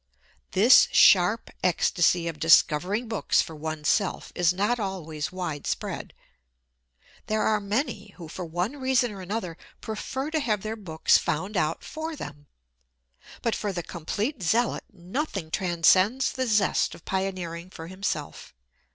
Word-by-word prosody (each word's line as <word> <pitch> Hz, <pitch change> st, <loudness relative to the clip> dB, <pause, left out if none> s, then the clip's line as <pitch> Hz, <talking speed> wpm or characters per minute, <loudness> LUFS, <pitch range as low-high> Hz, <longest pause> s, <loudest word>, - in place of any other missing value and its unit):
This 220 Hz, +7 st, +7 dB
sharp 190 Hz, +4 st, +5 dB
ecstasy 175 Hz, -1 st, +2 dB
of 160 Hz, -2 st, -5 dB
discovering 175 Hz, +7 st, +3 dB
books 220 Hz, -2 st, +1 dB
for 160 Hz, -, -1 dB
one's 155 Hz, 0 st, -4 dB
self 200 Hz, -4 st, 0 dB
is 175 Hz, -1 st, +3 dB
not 205 Hz, +7 st, 0 dB
always 165 Hz, -7 st, -4 dB
widespread. 175 Hz, -6 st, -4 dB, 1.1 s
There 215 Hz, 0 st, 0 dB
are 215 Hz, -1 st, +2 dB
many 210 Hz, +8 st, -3 dB
who, 170 Hz, -3 st, -9 dB
for 180 Hz, +4 st, -7 dB
one 175 Hz, -, -3 dB
reason 260 Hz, -3 st, +1 dB
or 195 Hz, -2 st, -8 dB
another, 185 Hz, -3 st, -4 dB, 0.2 s
prefer 265 Hz, +6 st, -4 dB
to 315 Hz, -, +1 dB
have 215 Hz, -8 st, -1 dB
their 215 Hz, +1 st, -3 dB
books 165 Hz, -7 st, +2 dB
found 185 Hz, +7 st, -3 dB
out 155 Hz, -2 st, 0 dB
for 315 Hz, +1 st, -5 dB
them. 145 Hz, -, -9 dB, 1.0 s
But 230 Hz, -, +1 dB
for 205 Hz, -, -2 dB
the 175 Hz, -2 st, -4 dB
complete 205 Hz, -, -4 dB
zealot 230 Hz, +7 st, +1 dB
nothing 195 Hz, -, -4 dB
transcends 185 Hz, +7 st, +3 dB
the 260 Hz, -1 st, -2 dB
zest 210 Hz, -4 st, +2 dB
of -, -, -17 dB
pioneering 185 Hz, -3 st, -3 dB
for 165 Hz, -3 st, -9 dB
himself. 185 Hz, -, -5 dB
190 Hz, 140 wpm, -26 LUFS, 170-220 Hz, 1.1 s, This